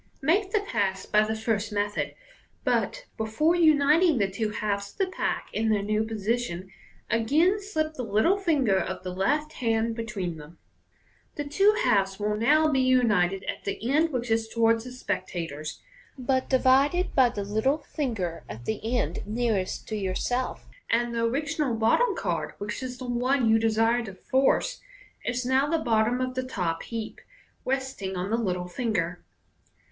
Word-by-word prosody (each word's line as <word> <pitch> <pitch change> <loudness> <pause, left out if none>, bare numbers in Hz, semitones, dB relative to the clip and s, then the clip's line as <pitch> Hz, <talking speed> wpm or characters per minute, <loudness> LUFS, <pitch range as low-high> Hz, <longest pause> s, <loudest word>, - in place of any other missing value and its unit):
Make 380 +7 +2
the 415 +1 +1
pass 195 - -1
by 210 - +3
the 220 +1 -2
first 220 -1 -1
method, 205 0 -1 0.5
but, - - 0
before 225 +10 +1
uniting 310 0 +4
the 200 -3 +2
two 215 +2 -1
halves 200 -1 -3
of - - -30
the 385 - +2
pack 375 - -3
in 220 +1 0
their 210 -2 +2
new 215 +1 +1
position, 220 -4 -2 0.4
again 300 - +3
slip 315 -7 -2
the 265 - -5
little 245 - +2
finger 280 - +2
of 185 0 -4
the 185 -1 -4
left 295 +11 0
hand 230 -3 0
between 205 -7 -4
them. 155 +2 -12 0.8
(The 295 - -3
two 390 +9 +3
halves 195 -1 +2
will 210 0 0
now 300 +9 +4
be 280 -3 +2
united 210 -8 +3
at - - -5
the 225 +5 -3
end 315 +3 +3
which 245 -3 -2
is 225 0 +1
towards 230 0 +2
the 250 - -7
spectators, 165 - -4 0.4
but 260 0 0
divided 275 +7 +3
by 260 -3 +5
the 205 -3 -4
little 220 +8 +1
finger 225 - -3
at 110 +4 -8
the 225 +3 -1
end 165 -2 -2
nearest 215 -4 -1
to 220 - -2
yourself 210 +6 -2 0.3
5 230 - +5
and 240 0 -3
the 230 0 0
original 285 +1 -1
bottom 390 - +3
card, - - -2
which 210 +4 -5
is 255 -1 -5
the 255 - -7
one 245 +1 +1
you 225 0 +5
desire 225 +2 +2
to 195 -3 -8
force, 270 - +1 0.4
is 245 0 -1
now 260 +2 +3
the 330 - +2
bottom 235 -2 +1
of 255 0 -1
the 255 - -1
top 180 -10 -2
heap, 225 -2 -6 0.4
resting 260 -8 -2
on 185 +3 -3
the 230 - +2
little 180 -5 -2
finger.) 180 -4 -2
230 Hz, 170 wpm, -27 LUFS, 205-270 Hz, 0.8 s, by